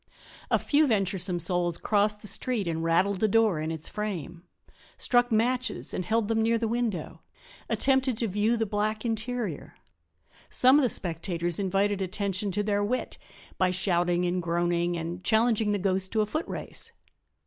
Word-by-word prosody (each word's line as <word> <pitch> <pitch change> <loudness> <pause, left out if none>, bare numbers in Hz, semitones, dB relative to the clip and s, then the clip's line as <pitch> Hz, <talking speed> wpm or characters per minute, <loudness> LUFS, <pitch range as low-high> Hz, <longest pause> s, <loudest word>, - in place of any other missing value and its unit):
A - - +4
few 300 +1 +2
venturesome 190 -5 0
souls 175 0 0
crossed 210 0 +1
the - - -8
street 230 -4 0
and 165 -1 -2
rattled 185 +4 +2
the 220 - +3
door 215 -5 +3
in 155 +1 -2
its 160 -1 -5
frame; 180 -6 -5 0.6
struck 245 -1 +2
matches 245 +3 0
and 185 - -2
held 220 +2 0
them 225 0 +1
near 230 +1 +2
the 225 0 -1
window; 225 -8 -2 0.5
attempted 265 -3 +1
to 230 - 0
view 210 +4 +1
the 225 - 0
black 215 +2 -2
interior. 230 +1 -3 0.7
Some 255 +3 +6
of - - +3
the 255 - +2
spectators 170 -1 -2
invited 195 +1 +1
attention 200 +1 -1
to 205 - 0
their 205 0 0
wit 250 +5 -2 0.4
by 185 - +3
shouting 175 -1 +1
and 180 +1 0
groaning 175 0 0
and 170 +2 -5
challenging 220 -1 +2
the 205 - +1
ghost 190 -1 0
to 220 - +2
a - - +2
footrace. 310 +10 -4
205 Hz, 165 wpm, -27 LUFS, 175-225 Hz, 0.7 s, Some